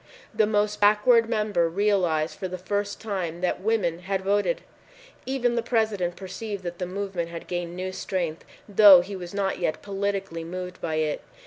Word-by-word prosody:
The 215 - +3
most 210 0 0
backward 225 +3 +5
member 210 -7 +1
realized 175 -5 +1
for 190 - -2
the 185 0 -5
first 205 +2 -2
time 180 -6 -4
that 180 0 -1
women 195 -6 0
had 190 +1 -2
voted. 205 - +1 0.7
Even 255 -2 +1
the 235 - +1
President 215 -7 0
perceived 200 +1 -6
that 175 -1 -6
the 180 - -2
movement 185 -2 -3
had 170 0 -7
gained 175 -1 -4
new 185 +1 -3
strength, 175 -4 -3 0.2
though 200 -3 +8
he 195 +3 -7
was 175 -2 -7
not 195 -1 -1
yet 155 - -2
politically 195 -4 -3
moved 180 +2 -6
by 160 -2 -2
it. 155 -1 -1
190 Hz, 175 wpm, -26 LUFS, 175-210 Hz, 0.7 s, though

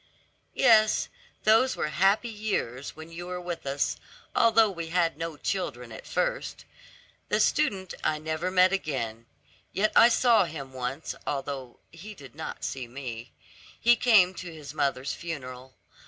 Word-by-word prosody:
"Yes, 215 -1 +4 0.3
those 225 +5 +4
were 155 - -2
happy 195 +8 +2
years 205 - -3
when 160 +1 -11
you 175 +1 -7
were 180 0 -4
with 175 -4 -6
us, 140 +1 0 0.4
although 225 -2 +5
we 170 -3 -5
had 170 -1 +1
no 165 0 -5
children 125 - -3
at 110 - -10
first. - - -2 0.6
The - - +2
student 200 - +1
I 155 - +1
never 160 +3 -2
met 185 0 +4
again. 115 - -3 0.5
Yet 215 +2 +1
I 235 - +8
saw 235 -4 +4
him 140 -5 -8
once, 130 +4 -4
although 135 -3 -4
he 200 +6 -10
did 135 -7 -13
not 155 +2 -7
see 130 -2 -4
me. 120 -2 -7 0.5
He 240 +1 +5
came 210 -7 +5
to 180 -2 -8
his 150 -3 -9
mother's 140 -2 -1
funeral. 130 -6 -7
165 Hz, 150 wpm, -27 LUFS, 135-200 Hz, 0.6 s, I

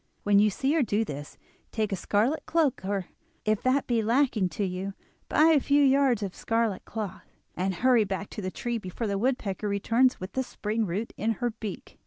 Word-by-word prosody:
When 205 -1 +4
you 210 +1 +5
see 265 +8 0
her 325 - +3
do 225 -2 +1
this, 145 -4 -7 0.3
take 215 -2 -1
a - - +1
scarlet 220 - 0
cloak, 315 - +1
or 195 -1 -2 0.4
if 215 -1 +1
that 260 +2 +2
be 235 -2 +1
lacking 230 -4 +2
to 200 +5 -2
you, 190 +1 -4 0.3
buy 310 +2 +5
a 315 -3 +5
few 285 +2 +3
yards 270 -5 +3
of 190 -2 -4
scarlet 225 -4 -1
cloth, 210 -4 -6 0.2
and 190 +1 -1
hurry 245 +2 +4
back 195 0 -4
to - - -5
the 185 - -2
tree 240 +4 -3
before 185 +3 -5
the 200 -2 -1
woodpecker 215 -4 -1
returns 230 +6 +2
with 185 +2 -6
the 260 - 0
spring 220 -3 -2
root 200 +7 -3
in 225 +2 0
her 240 +3 -2
beak. 215 -3 -8
215 Hz, 205 wpm, -27 LUFS, 195-250 Hz, 0.4 s, you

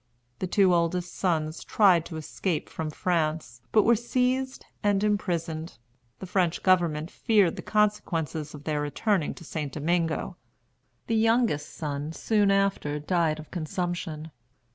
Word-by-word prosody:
The 185 - -2
two 185 0 +4
oldest 175 +1 0
sons 160 -3 -1
tried 185 -6 +4
to 160 - -6
escape 160 +1 -3
from 160 -1 -4
France, 155 -7 -1
but 215 - +5
were 235 - +5
seized 255 +3 -1 0.2
and 205 -1 +2
imprisoned. 170 -7 -1 0.4
The - - -7
French 180 -2 0
government 170 -4 +2
feared 205 -7 +2
the - - -6
consequences 165 -8 0
of 145 - -11
their 150 -1 -1
returning 165 +4 0
to - - -12
St. 150 -3 -4
Domingo. 165 +3 -1 0.7
The 225 - 0
youngest 225 -9 +2
son 150 0 -4
soon 210 +2 +2
after 195 -7 +1
died 160 0 +1
of 155 -1 -11
consumption. 170 -2 -4
170 Hz, 140 wpm, -27 LUFS, 155-200 Hz, 0.7 s, but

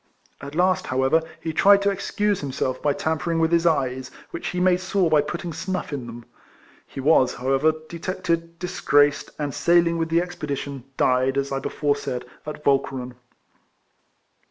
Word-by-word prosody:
At 140 +1 -8
last, 185 +2 +2
how 130 +1 0
ever, 160 +5 +3 0.2
he 160 - -3
tried 200 +4 +5
to 200 - +3
excuse 205 +1 -1
himself 130 -2 -2
by 145 - +2
tamper 160 +3 -1
ing 165 - +1
with 165 0 +2
his 170 0 +3
eyes, 130 -4 0 0.2
which - - -5
he 180 - -2
made 180 0 +3
sore 185 -2 0
by 150 -1 +5
putting 165 +3 -5
snuff 185 -2 -4
in 130 -4 -4
them. 120 0 -9 0.6
He - - -9
was, 135 -2 +3
however, 135 +5 +2 0.2
detected, 170 -1 -3
disgraced, 145 -5 +2
and, 145 -2 -3
sailing 170 -1 +3
with 165 0 -1
the 165 +1 +3
expedition, 145 -7 -5
died, 130 +1 +2
as 140 0 -1
I 135 - -1
before 145 +1 0
said, 125 -3 -4 0.2
at 150 0 -7
Walche 140 -1 +3
ren. 125 -2 -6
155 Hz, 175 wpm, -23 LUFS, 135-175 Hz, 0.6 s, tried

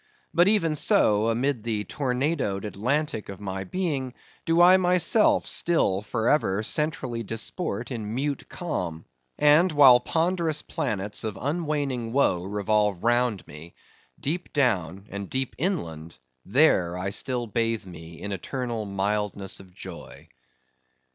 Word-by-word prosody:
But 175 +2 +5
even 200 -7 +4
so, 110 -6 +3
amid 125 +2 0
the 110 -3 -2
tornadoed 130 -5 -1
Atlantic 120 +3 -2
of 100 - -8
my 95 -1 -4
being, 140 - -3 0.3
do 165 +1 +3
I 180 +2 +8
myself 180 +4 +3
still 130 - +1
for 110 +1 -2
ever 105 -9 +2
centrally 125 -4 -1
disport 115 - -4
in 110 -2 -4
mute 140 +2 -3
calm; 90 - -4 0.3
and 150 +5 +5
while 135 -5 +7
ponderous 165 -1 0
planets 105 0 -3
of 110 -2 -4
unwaning 145 -6 -2
woe 110 -10 +2
revolve 105 -1 0
round 120 -4 +1
me, 75 +3 -12 0.4
deep 170 +5 -3
down 100 - 0
and 100 -1 -6
deep 130 -1 -2
inland 85 - -3 0.3
there 95 - +3
I 95 +2 -3
still 125 +3 -2
bathe 115 -1 -1
me 80 -2 -11
in 100 - -5
eternal 115 +3 -4
mildness 100 0 -2
of 95 -1 -15
joy. 90 -4 -10
115 Hz, 130 wpm, -26 LUFS, 100-150 Hz, 0.4 s, I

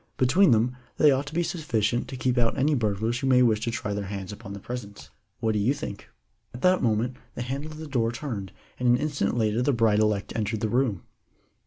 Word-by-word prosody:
Between 170 +10 +4
them 120 +2 +3 0.2
they 150 - +6
ought 135 +2 0
to 145 - -7
be 175 - +2
sufficient 120 - -1
to 130 0 -7
keep 125 -1 0
out 120 -2 +1
any 150 +3 +2
burglars 110 -1 0
who 135 - -1
may 125 -1 +5
wish 110 -3 +3
to 115 - -1
try 105 -3 -3
their 100 0 -3
hands 95 -1 -5
upon 100 -1 -9
the 100 - -7
presents. 105 -2 -8 0.3
What 110 -1 +2
do 105 - 0
you 120 +8 +2
think?" 120 -9 -7 0.5
At 120 - -9
that 185 0 +4
moment 120 +2 0 0.2
the 120 - -3
handle 140 +5 -4
of 155 - -9
the 160 - -7
door 120 -6 0
turned, 120 -6 -5 0.3
and 125 -1 +2
an 120 - +5
instant 140 -6 -1
later 110 0 +1
the 140 +3 +2
bride 110 -3 +3
elect 105 -2 0
entered 110 0 -2
the 110 - 0
room. 120 -6 0
120 Hz, 230 wpm, -26 LUFS, 105-135 Hz, 0.5 s, they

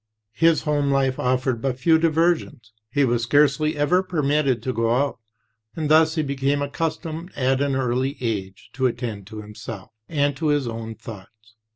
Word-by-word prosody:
"His 165 +7 +3
home 145 -2 +1
life 135 -1 +1
offered 125 -1 0
but 130 -1 -1
few 160 +4 +4
diversions. 160 -7 0 0.2
He 140 +4 +2
was 120 -1 +1
scarcely 145 +4 +2
ever 165 +6 +3
permitted 150 -8 0
to 130 - -2
go 115 0 +1
out, 140 -1 0 0.6
and 155 -2 -2
thus 160 +1 +5
he 155 - +1
became 140 0 0
accustomed, 165 +3 -4
at 130 0 +1
an 140 -1 +1
early 130 +2 -1
age, 100 -6 -4
to 130 +1 +1
attend 115 -5 -5
to 110 -1 -8
himself 105 -1 -9 0.2
and 145 -3 +1
to 155 - -1
his 145 -4 +1
own 115 -1 -5
thoughts. 110 0 -12
135 Hz, 170 wpm, -23 LUFS, 120-150 Hz, 0.6 s, thus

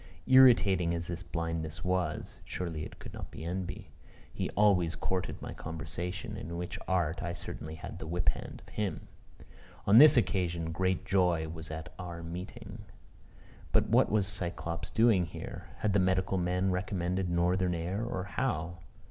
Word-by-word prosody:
Irritating 105 -10 +6
as 85 0 -3
this 85 +1 -5
blindness 80 -2 -3
was, 90 -4 -1
(surely 80 -4 -4
it - - -9
could - - -10
not - - -7
be 80 - -8
envy?) 90 +1 -4 0.4
he - - -2
always 95 -5 +4
courted 95 -1 -2
my - - -5
conversation, 85 +2 -5
in 85 +2 -5
which 90 0 -4
art 85 -3 +1
I 85 -1 -2
certainly 80 -2 -6
had 80 - -8
the - - -6
whip 85 +2 +1
hand - - -4
of - - -16
him. 105 -3 -3 0.8
On 105 +4 +8
this 150 -1 +9
occasion, 85 -7 +1
great 95 +2 0
joy 90 -4 +2
was 80 -1 -6
at 80 +2 -6
our 85 -2 -6
meeting. 85 +3 -7 0.9
But - - +3
what - - +4
was 105 -2 +3
Cyclops 85 -4 -4
doing 110 -6 +4
here? - - -8
Had 105 -2 +2
the 100 - +4
medical 95 +1 +2
men 90 +2 +1
recommended 90 0 -1
northern 90 +1 +2
air, 90 +6 -2
or 105 -6 -2
how? 85 - -2
90 Hz, 160 wpm, -31 LUFS, 85-95 Hz, 0.9 s, this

